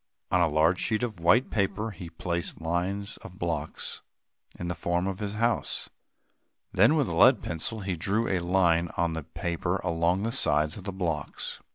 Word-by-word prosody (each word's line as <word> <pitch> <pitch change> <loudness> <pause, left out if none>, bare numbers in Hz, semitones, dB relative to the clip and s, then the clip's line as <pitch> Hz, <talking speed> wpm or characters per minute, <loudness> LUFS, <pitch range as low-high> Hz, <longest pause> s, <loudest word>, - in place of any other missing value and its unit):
On 90 - +4
a 85 - +5
large 80 +4 +3
sheet 110 +2 0
of 110 -7 -3
white 110 +10 +4
paper, 105 +1 0
he 90 -4 -9
placed 85 +1 -3
lines 90 +5 -2
of 90 - -12
blocks 80 -4 -3 0.6
in 90 - -4
the 90 - -1
form 85 +1 -1
of 95 -1 -3
his 105 -1 -3
house. 115 +1 0 0.8
Then, 110 - +5
with 145 -4 +2
a - - -3
lead 125 -4 +6
pencil, 90 +6 -3
he 95 -2 -2
drew 100 +7 0
a 95 - +1
line 85 -1 +2
on 85 -1 +1
the 80 - -3
paper 85 +3 -2
along 85 +2 +1
the 115 - -1
sides 75 - +2
of 95 - -9
the 100 - -2
blocks. 85 -6 -3
90 Hz, 185 wpm, -28 LUFS, 85-100 Hz, 0.8 s, lead